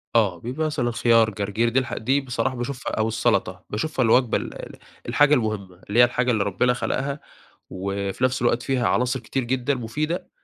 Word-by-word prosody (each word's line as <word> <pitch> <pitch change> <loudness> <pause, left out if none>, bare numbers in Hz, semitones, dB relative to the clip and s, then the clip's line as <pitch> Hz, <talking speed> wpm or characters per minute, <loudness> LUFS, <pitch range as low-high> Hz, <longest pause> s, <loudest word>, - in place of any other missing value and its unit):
آه، 100 -7 +3
بيبقى 130 +7 -3
مثلًا 120 -6 -1
خيار، 115 -1 +4
جرجير، 105 +3 -1
دي 125 +3 +2
الح 130 - -4
دي 135 +5 +1
بصراحة 125 0 -2
باشوفها، 125 +2 -4
أو 110 0 +1
السلطة 110 - 0
باشوفها 130 +4 -1
الوجبة 120 +1 +4
ال - - -6
ال - - -10 0.3
الحاجة 145 0 +4
المهمة، 100 -7 -1
اللي 115 +4 +2
هي - - +9
الحاجة 125 +1 +2
اللي 105 -3 +1
ربنا 100 +6 +1
خلقها، 140 +3 -2 0.5
وفي 100 +3 -3
نفس 130 -1 +1
الوقت 120 0 +1
فيها 130 -3 0
عناصر 125 +2 +1
كتير 135 0 -3
جدًا 130 +3 0
مفيدة، 150 +8 -3
120 Hz, 185 wpm, -23 LUFS, 110-130 Hz, 0.5 s, هي